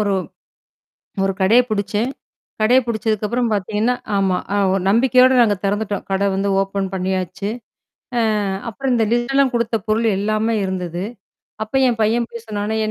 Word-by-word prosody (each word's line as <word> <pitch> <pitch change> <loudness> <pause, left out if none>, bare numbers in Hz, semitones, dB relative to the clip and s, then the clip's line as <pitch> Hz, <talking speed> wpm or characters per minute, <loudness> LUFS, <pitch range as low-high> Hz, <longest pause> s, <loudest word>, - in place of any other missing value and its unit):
ஒரு 200 - 0 1.1
ஒரு 195 - 0
கடையைப் 240 +6 +4
புடிச்சேன். 210 +3 -1 0.5
கடைய 245 +4 +5
புடிச்சதுக்கப்புறம் 220 +1 -1
பாத்தீங்கன்னா, 210 +5 0 0.2
ஆமா 190 -2 +1 0.2
அ, - - +2 0.2
ஒ - - +2
நம்பிக்கையோட 255 +3 +5
நாங்க 210 -3 +3
திறந்துட்டோம். 205 0 -1
கடை 200 +1 +1
வந்து 200 +1 0
ஓப்பன் 195 0 -2
பண்ணியாச்சு. 185 +1 -2 0.7
அ - - +3 0.5
அப்புறம் 260 +3 -2
இந்த 225 -2 +2
லிஸ்ட்டெலாம் 265 +3 +2
கொடுத்த 235 -1 0
பொருள் 225 +2 +1
எல்லாமே 215 +2 0
இருந்தது. 180 -1 -3 0.6
அப்ப 220 +5 -8
என் 230 -2 0
பையன் 230 +2 +1
போயி 235 - -8
சொன்னானா, 210 +1 -2
215 Hz, 140 wpm, -20 LUFS, 195-235 Hz, 1.1 s, கடைய